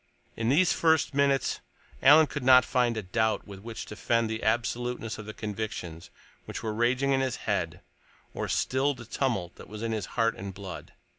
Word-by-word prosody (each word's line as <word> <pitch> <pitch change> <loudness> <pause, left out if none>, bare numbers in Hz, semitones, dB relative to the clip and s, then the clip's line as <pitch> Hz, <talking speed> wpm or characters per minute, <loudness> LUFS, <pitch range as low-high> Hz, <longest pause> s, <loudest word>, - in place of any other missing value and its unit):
In 115 0 -1
these 165 +7 +4
first 160 -2 +2
minutes 140 -1 +2 0.4
Alan 150 +3 +8
could 145 -1 -5
not 130 -1 +7
find 120 -3 +1
a 110 - -3
doubt 110 +2 0
with 100 -1 -9
which 115 +2 -7
to 105 - -9
fend 115 0 +1
the 110 - -3
absoluteness 120 +1 -1
of 105 - -8
the 110 - -6
convictions 105 -6 -5 0.4
which - - -6
were 110 -1 -2
raging 125 +5 +1
in 135 -1 +3
his 130 -2 -1
head, - - -1 0.5
or - - -3
still 135 +2 +1
the 120 -1 -10
tumult 105 -8 -2
that - - -12
was 105 +1 -7
in 115 - -1
his 110 -4 -2
heart 115 -1 +2
and 95 -1 -7
blood. 95 -4 -8
115 Hz, 195 wpm, -28 LUFS, 105-130 Hz, 0.5 s, Alan